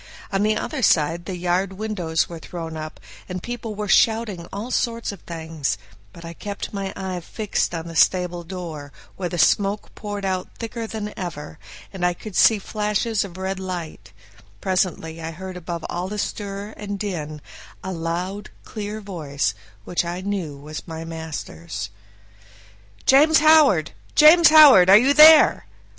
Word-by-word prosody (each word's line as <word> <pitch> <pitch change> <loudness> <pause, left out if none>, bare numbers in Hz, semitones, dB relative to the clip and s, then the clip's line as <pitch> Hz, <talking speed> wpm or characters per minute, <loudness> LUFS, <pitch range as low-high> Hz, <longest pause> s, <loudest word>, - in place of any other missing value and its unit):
On 195 0 0
the 215 +1 +2
other 285 +4 -4
side 170 -3 +2
the 190 - -4
yard 180 +2 -1
windows 185 -6 -1
were 170 -1 -8
thrown 165 -1 -7
up, 155 0 -7 0.3
and 180 -1 -5
people 235 -3 -5
were 210 0 -4
shouting 215 -5 +2
all 215 +5 -6
sorts 230 -3 -1
of 200 - -11
things; 160 -6 -4 0.3
but 170 - -12
I 165 - -7
kept 200 +5 -6
my 195 -1 -3
eye 190 -2 -4
fixed 200 0 -2
on 165 0 -5
the 165 -1 -8
stable 180 +1 +2
door, 165 -5 -7 0.2
where 180 -2 -4
the 175 - -4
smoke 200 +6 +1
poured 205 -2 -6
out 185 -1 -3
thicker 230 0 -5
than 210 -1 -5
ever, 165 -4 -7 0.3
and 190 -2 -6
I 180 0 +2
could 210 +1 -10
see 220 - +5
flashes 210 +1 -1
of 185 -3 -9
red 190 0 -3
light; 175 - -6 0.5
presently 180 -4 -1
I 160 - -4
heard 185 +3 -8
above 170 -2 -6
all 175 +1 -3
the 210 +2 -5
stir 205 0 -4
and 205 -1 -5
din 155 -7 -5 0.4
a 190 - -4
loud, 180 +4 -4
clear 215 0 -6
voice, 145 - -3 0.3
which 175 - -1
I 175 +1 -4
knew 185 -7 -4
was 150 +4 -9
master's: 160 - -6 1.1
"James 305 +4 +6
Howard! 300 - +5 0.2
James 320 +2 +8
Howard! 285 - +8
Are 195 - +10
you 260 +6 +4
there?" 305 - +7
185 Hz, 160 wpm, -22 LUFS, 165-210 Hz, 1.1 s, Are